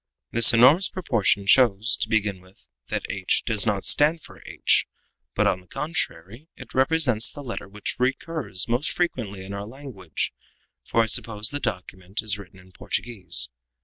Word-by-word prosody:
This 115 -1 +8
enormous 130 +11 +6
proportion 115 - 0
shows, 115 +1 +4
to - - -3
begin 105 -4 0
with, 95 +1 -22 0.2
that - - -3
h 95 -1 0
does 110 -2 0
not 100 -2 0
stand 155 +2 +3
for - - -14
h, - - +2 0.5
but, - - +2
on 90 - +1
the 90 - -23
contrary, 130 - -4
that - - -8
it - - -15
represents 130 -4 +2
the 145 - -10
letter 115 -6 -6
which 105 +1 -6
recurs 130 - -2
most 120 +5 0
frequently 110 - -3
in 100 - -7
our 100 +1 -5
language, 115 - -5 0.5
for 115 - +2
I - - 0
suppose 105 -1 -1
the 145 - -3
document 95 0 -4
is 105 -2 -1
written 95 -1 -13
in 90 0 -18
Portuguese. 90 - -2
110 Hz, 170 wpm, -24 LUFS, 95-130 Hz, 0.5 s, This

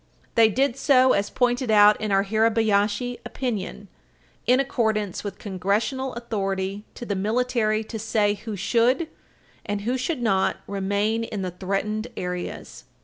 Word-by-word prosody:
They 225 -2 +6
did 260 +3 +1
so, 260 -2 +5
as 200 0 0
pointed 245 -1 0
out 210 -1 +6
in 215 -1 -2
our 195 0 +4
Hirabayashi 220 +2 +1
opinion, 240 -7 -4 0.6
in 250 +1 +5
accordance 220 -7 0
with 205 - -5
Congressional 210 +7 -1
authority 195 -3 -3
to 240 - -7
the 205 - -2
military 220 +1 0
to 220 0 -7
say 215 -1 +1
who 210 +1 -6
should, 240 - +2 0.5
and 205 -1 -3
who 245 +5 -1
should 255 0 -2
not, 195 -4 +2
remain 200 +3 0
in 210 -4 -4
the 185 - -3
threatened 200 +5 -2
areas. 180 0 -5
215 Hz, 145 wpm, -24 LUFS, 200-240 Hz, 0.6 s, They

